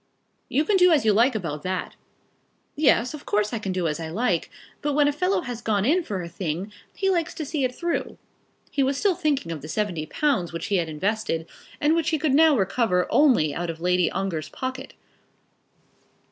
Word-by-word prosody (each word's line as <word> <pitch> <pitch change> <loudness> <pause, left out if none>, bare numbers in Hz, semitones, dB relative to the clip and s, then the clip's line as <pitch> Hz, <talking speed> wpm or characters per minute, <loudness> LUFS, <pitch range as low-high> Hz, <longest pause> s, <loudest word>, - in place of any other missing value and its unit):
"You 295 +3 +1
can 400 +4 +3
do 360 -1 +6
as 300 -7 +3
you 215 - +5
like 235 +4 +3
about 160 -8 -3
that." 185 +2 -3 0.8
"Yes; 255 -4 +3
of 300 - -8
course 210 +2 +1
I 230 - -1
can 195 -3 -3
do 185 -2 -1
as 150 +1 -2
I 160 -1 -5
like; 180 -1 0 0.3
but 295 0 -1
when 290 0 +4
a - - +3
fellow 360 +7 0
has 245 -2 -6
gone 210 -3 0
in 330 +8 +3
for 195 - -4
a - - -6
thing, 175 +3 -4 0.2
he 385 -1 +1
likes 340 -3 -1
to 320 -2 -4
see 285 -1 -2
it 250 -1 -1
through." 345 -1 -2 0.5
He 280 - 0
was 270 +1 +1
still 395 +5 +2
thinking 300 - -1
of 160 -3 -5
the 155 - -8
seventy 170 -4 -2
pounds 265 - 0
which 165 0 -5
he 200 -2 +1
had 165 -2 -1
invested, 165 0 -2 0.3
and 295 +2 +3
which 330 0 +1
he 320 - +1
could 300 -2 0
now 310 -1 +5
recover 195 -2 +1
only 240 - +4
out 175 +2 -3
of 165 -1 -5
Lady 180 0 +2
Ongar's 165 -6 -3
pocket. 260 +1 -6
225 Hz, 210 wpm, -24 LUFS, 180-295 Hz, 0.8 s, do